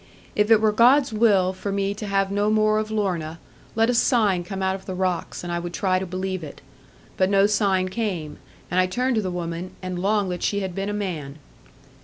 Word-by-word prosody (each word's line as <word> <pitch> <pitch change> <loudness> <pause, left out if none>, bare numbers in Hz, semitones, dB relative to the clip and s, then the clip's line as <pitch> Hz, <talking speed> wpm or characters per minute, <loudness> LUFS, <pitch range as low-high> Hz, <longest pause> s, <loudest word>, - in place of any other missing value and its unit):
If 210 +1 +2
it 225 -2 +7
were 215 -1 +4
God's 250 +4 +4
will 200 -4 +3
for 200 +2 -5
me 200 0 -1
to 210 +1 -7
have 195 0 +1
no 205 +1 +1
more 215 0 +3
of 215 0 -3
Lorna, 180 -7 -2 0.4
let 225 +1 +3
a 245 - +2
sign 215 -7 +2
come 195 +1 -5
out 190 0 +1
of 190 0 -8
the 185 - -4
rocks, 180 -2 -2
and 175 0 -4
I 170 - -1
would 175 0 -6
try 185 -2 +1
to 190 - -5
believe 185 0 -3
it. 145 - -9 0.6
But 185 0 +2
no 195 0 +4
sign 200 -3 +2
came, 185 -7 -3 0.3
and 180 - +2
I 185 - +3
turned 250 +7 0
to - - +2
the 190 - -3
woman, 175 0 -5
and 185 -1 -5
longed 200 0 +1
that 175 - -4
she 200 0 0
had 190 -2 -4
been 195 +2 -3
a - - -1
man. 165 -9 -4
195 Hz, 230 wpm, -23 LUFS, 185-210 Hz, 0.6 s, it